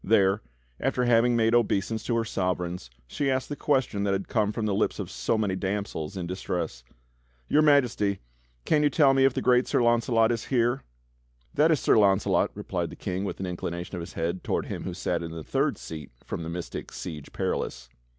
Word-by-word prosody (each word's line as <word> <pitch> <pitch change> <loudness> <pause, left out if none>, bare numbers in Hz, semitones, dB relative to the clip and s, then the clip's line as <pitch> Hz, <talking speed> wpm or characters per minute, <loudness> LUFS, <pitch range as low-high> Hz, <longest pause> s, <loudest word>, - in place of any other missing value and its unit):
There, 100 -1 +3 0.4
after 125 - 0
having 120 0 +4
made 115 0 +3
obeisance 110 -2 +1
to 120 - 0
her 115 0 +1
Sovereigns, 90 - -2 0.2
she 135 - -1
asked 130 -1 0
the 145 - -3
question 130 -9 0
that 100 -1 +1
had 95 0 -2
come 105 -3 +1
from 110 0 -3
the 105 - 0
lips 100 - 0
of - - -5
so 60 - 0
many 100 -4 0
damsels 95 -3 -3
in 90 - -3
distress; 85 -8 -4 0.6
"Your 150 - +4
Majesty, 125 -10 +3 0.5
can 150 - +3
you 150 - +4
tell 140 -3 +4
me 135 0 +4
if 135 - +3
the - - -1
great 125 0 +4
Sir - - +2
Launcelot 120 -1 +3
is 115 -2 -2
here.?" 120 0 +1 0.7
"That 150 +3 +4
is 155 -4 +3
Sir - - +4
Launcelot," 100 -1 +3
replied - - -3
the - - -9
King 95 +2 -3
with - - -4
an 95 - -2
inclination 90 0 -4
of 90 - -4
his 85 - -8
head 85 +2 -2
toward - - -1
him - - -5
who 90 - -4
sat 90 -2 -1
in 85 - -5
the 80 -1 -7
third - - 0
seat 75 -4 -8 0.2
from - - -4
the 80 - -5
mystic 85 +1 -6
Siege 80 -6 -7
Perilous. - - -3
100 Hz, 210 wpm, -27 LUFS, 90-120 Hz, 0.7 s, having